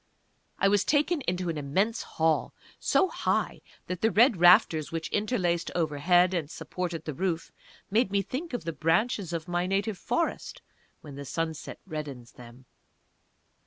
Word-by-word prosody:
I 195 - +3
was 205 0 +3
taken 300 +2 +1
into 180 0 -1
an 160 -2 -2
immense 195 +11 0
Hall, 160 -1 0 0.2
so 380 - +3
high - - -1 0.2
that 180 -1 -5
the 225 - +4
red 230 0 +4
rafters 175 -3 +5
which 165 -1 -3
interlaced 190 -6 0
overhead 175 +3 +3
and 165 -5 -2
supported 165 0 -5
the 155 - -3
roof 170 +1 -2 0.4
made 220 0 +3
me 200 0 +1
think 295 - -5
of 245 - -3
the 165 0 -3
branches 175 +4 0
of 165 -2 -4
my 175 +1 -1
native 195 +1 -1
Forest, - - -2 0.4
when 145 -2 -10
the 140 - -6
sunset 160 +2 -4
reddens 145 -8 -7
them. 125 +1 -14
175 Hz, 155 wpm, -28 LUFS, 155-200 Hz, 0.4 s, rafters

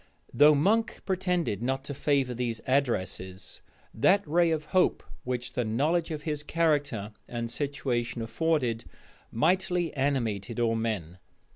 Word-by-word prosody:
Though 150 +1 +7
Monk 215 +10 +1
pretended 180 - 0
not 135 +2 -1
to 140 - -5
favor 135 -2 +1
these 120 -2 -2
addresses, 95 -8 -1 0.3
that 190 - +3
ray 170 +2 +3
of 155 -2 -1
hope 185 -1 +3 0.2
which 125 -1 -3
the 125 - 0
knowledge 150 +10 +1
of 155 -2 -5
his 150 -2 -2
character 145 -10 0 0.2
and 115 -1 -4
situation 125 -4 -2
afforded, 120 -2 0 0.5
mightily 175 +5 +1
animated 120 -6 -1
all 115 -1 +2
men. 105 -7 -3
135 Hz, 130 wpm, -28 LUFS, 115-160 Hz, 0.5 s, Though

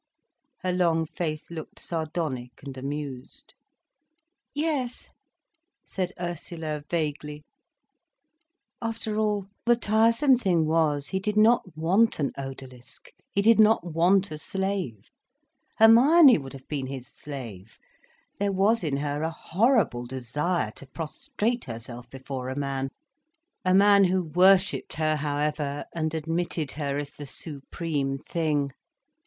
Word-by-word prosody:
Her 185 -1 0
long 165 -3 +2
face 155 -1 -4
looked 160 -2 -8
sardonic 155 -8 -4
and 140 -2 -7
amused. 135 -1 -6 1.0
"Yes," 290 -5 -2 0.7
said 185 -2 -3
Ursula 165 -3 -5
vaguely. 150 -2 -3 1.4
After 225 -2 -3
all, 210 -2 0 0.2
the 240 - +6
tiresome 230 +5 +4
thing 180 -9 +2
was, 155 -3 +1
he 190 - -1
did 210 +2 -2
not 215 -6 +3
want 190 +8 +3
an 140 - 0
odalisk, 130 -2 -9 0.2
he 200 - +2
did 225 +1 +5
not 215 -2 +5
want 185 +4 +3
a 155 - -5
slave. 190 - -3 0.7
Hermione 250 - +7
would 135 -1 -9
have 135 -1 -12
been 140 -3 -3
his 130 -2 -6
slave—there 125 - -8
was 200 +3 +2
in 145 -4 0
her 145 +1 -2
a 160 - 0
horrible 170 - +1
desire 130 +2 -1
to 140 - -10
prostrate 235 - -3
herself 120 0 -8
before 130 0 -6
a 130 - -4
man—a 270 - -5
man 200 0 +6
who 185 0 +1
worshipped 185 +4 +3
her, 155 0 +1
however, 145 0 -2
and 160 -1 -2
admitted 165 -1 -2
her 140 -2 -3
as 145 -1 -4
the 145 - -9
supreme 140 -1 -3
thing. 150 -2 -1
160 Hz, 120 wpm, -26 LUFS, 140-200 Hz, 1.4 s, Hermione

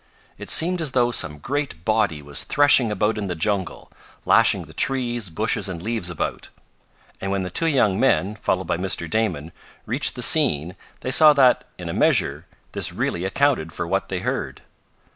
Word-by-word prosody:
It - - -8
seemed 175 +2 +3
as 150 -5 -2
though 120 -1 +2
some 75 -9 -2
great 125 - -4
body 105 -9 0
was 75 0 -2
threshing 140 -6 +3
about 105 +2 -1
in 100 - -4
the 90 - -4
jungle, 95 +2 -3 0.3
lashing - - +3
the - - -15
trees, 120 -6 -1
bushes 80 - -2
and 85 -2 -6
leaves 110 -1 -2
about, 85 - -4 0.7
and 95 - -3
when 100 -1 -1
the 90 - -6
two 165 - +1
young 110 -10 +2
men, 105 -6 +1
followed 95 -3 -2
by - - -2
Mr. 90 -2 -2
Damon, 85 -7 -2 0.3
reached - - +1
the - - -2
scene 80 +6 +3 0.3
they 130 - -3
saw 155 +2 +7
that, 130 -3 +3
in - - -8
a - - -4
measure, - - +1 0.2
this - - -1
really 85 +2 -3
accounted 95 - 0
for 85 - -4
what 95 +3 -2
they 95 -2 -3
heard. - - -4
105 Hz, 180 wpm, -22 LUFS, 90-125 Hz, 0.7 s, saw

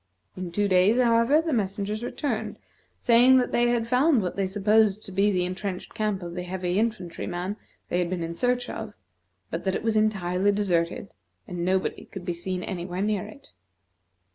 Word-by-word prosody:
In 185 -2 -5
two 205 +4 +1
days, 190 +4 +4
however, 235 +4 +4
the 320 -2 -1
messengers 210 0 -2
returned, 220 -4 -3 0.4
stating 245 +2 +6
that 250 - +1
they 240 0 +3
had 240 -1 +1
found 255 0 +3
what 180 - -3
they 195 -1 0
supposed 210 +1 +2
to - - -9
be 200 +2 +2
the 180 -2 +1
intrenched 185 +1 -5
camp 210 -4 -1
of 170 -1 -6
the 180 - -4
heavy 180 +1 -2
infantry 215 -7 -2
man 180 +3 -3 0.3
they 175 - 0
had 175 -1 0
been 180 -1 -2
sent 165 - -3
in - - -5
search 245 +5 0
of, - - -6 0.6
but - - -3
that 190 -1 0
it - - -3
was 225 -1 +1
entirely 200 -3 +2
deserted, 185 -2 0 0.4
and 175 -1 -4
nobody 185 +1 0
could 190 -2 -9
be 175 - -1
seen 180 +1 -4
anywhere 180 0 -4
near 210 -1 -1
it. 245 +6 -15
200 Hz, 190 wpm, -26 LUFS, 180-225 Hz, 0.6 s, stating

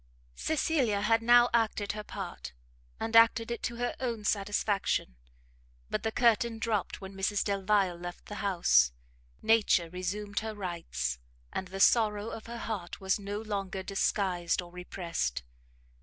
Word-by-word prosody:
Cecilia 270 - +1
had 225 +2 +3
now 240 +1 +6
acted 215 -3 +1
her 210 0 -6
part, - - -7 0.5
and 225 0 -2
acted 230 0 +6
it 235 - -3
to 240 - -3
her 245 +1 -2
own 235 -4 -2
satisfaction; 205 - 0 0.8
but - - 0
the 220 - -1
curtain 235 -1 +3
dropt 220 -4 -2
when 190 0 -8
Mrs 195 +1 0
Delvile 195 -2 +1
left 175 0 -8
the 210 - -7
house, 65 - +4 0.5
nature 205 -7 +3
resumed 200 +3 -3
her 220 0 -5
rights, 170 - -3 0.3
and 190 - -3
the 190 +1 -7
sorrow 215 0 +3
of 225 - -8
her 235 0 -6
heart 205 -7 -5
was 190 +1 0
no 205 +1 -4
longer 195 -3 -3
disguised 190 -3 0
or 175 -1 -5
repressed. 170 - -3
205 Hz, 145 wpm, -30 LUFS, 185-225 Hz, 0.8 s, now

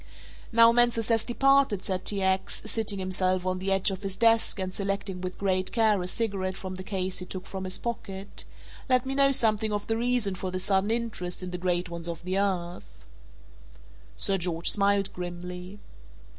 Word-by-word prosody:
"Now 230 0 +7
Mansus 235 -1 +3
has 225 -1 +3
departed," 270 -4 +3
said 190 -3 -2
T. 200 -2 +1
X., 190 0 0
sitting 220 -3 +1
himself 185 -1 +1
on 185 0 -1
the 195 +1 -2
edge 195 +1 +2
of 190 0 -5
his 195 -1 -4
desk 230 -1 +3
and 185 -1 -3
selecting 195 -2 -3
with 185 0 -5
great 185 -1 0
care 215 -4 +2
a 180 - -4
cigarette 195 -3 -2
from 185 -1 -6
the 185 - -7
case 185 -2 -2
he 180 - -6
took 185 0 -6
from 190 -1 -6
his 185 - -1
pocket, 200 -4 -5 0.5
"let 255 0 +3
me 265 - -2
know 275 0 +4
something 220 -4 +2
of 205 -1 -2
the 225 - -1
reason 240 -4 0
for 185 0 -4
this 185 0 -4
sudden 195 +1 +2
interest 220 -6 -3
in 180 - -5
the 180 - -4
great 180 0 0
ones 170 0 -5
of 165 0 -6
the 185 +2 -1
earth." 175 - -3 1.1
Sir 195 - +2
George 170 -1 +1
smiled 200 -1 +2
grimly. 180 +2 -7
195 Hz, 190 wpm, -27 LUFS, 185-220 Hz, 1.1 s, Now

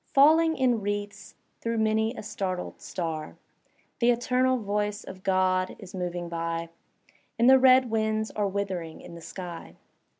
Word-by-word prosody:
Falling 320 +3 +5
in 245 -4 +2
wreaths 205 0 -4 0.3
through 230 0 -1
many 220 +2 +1
a - - -7
startled 195 -3 -4
star. 160 -4 -5 0.6
The 240 -1 +3
eternal 250 +2 +2
voice 210 -1 -2
of 185 0 -10
God 185 -1 +1
is 195 -2 -12
moving 175 -2 -3
by. 165 0 -3 0.7
And 235 - +4
the 265 0 +8
red 255 -2 +5
winds 220 0 0
are 210 -1 -1
withering 190 -5 -4
in - - -11
the 170 - -10
sky. 175 0 -8
205 Hz, 145 wpm, -27 LUFS, 185-235 Hz, 0.7 s, the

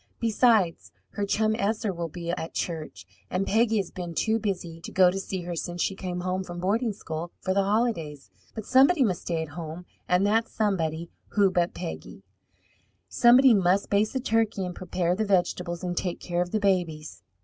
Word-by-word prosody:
Besides, 220 -6 +2 0.2
her 205 -1 -3
chum 215 +2 +1
Esther 215 -1 -1
will 170 -1 -4
be 170 +1 -5
at 165 -1 -5
church, 160 -3 -4 0.2
and 185 +2 -1
Peggy 225 +2 +2
has 195 -4 -2
been 175 -2 -6
too 225 +5 +1
busy 175 -6 -4
to - - -8
go 185 -1 +5
to 195 - -3
see 190 -1 -4
her 175 0 -4
since 175 +1 -5
she - - 0
came 180 -2 -5
home 185 +1 -2
from 175 -1 -7
boarding 220 +6 0
school 165 -4 -6
for 185 - -1
the 200 - +3
holidays. 195 - -1 0.2
But 220 - -6
somebody 270 +4 +5
must 190 -7 0
stay 165 -2 -2
at 160 - -8
home, 165 +2 -7 0.2
and 180 +2 +3
that 225 +2 +2
somebody 170 -6 -1 0.2
who 200 -3 +4
but 175 -1 0
Peggy? 80 +4 -7 0.9
Somebody 250 +1 +6
must 195 -1 +2
baste 205 +1 +2
the 265 - 0
turkey 225 -5 0
and 180 - -5
prepare 175 -1 -1
the 220 - 0
vegetables 180 -3 0
and 180 -1 -2
take 175 0 -2
care 175 -1 -2
of 175 - -2
the 215 - 0
babies. 175 -6 -1
185 Hz, 195 wpm, -26 LUFS, 175-215 Hz, 0.9 s, Somebody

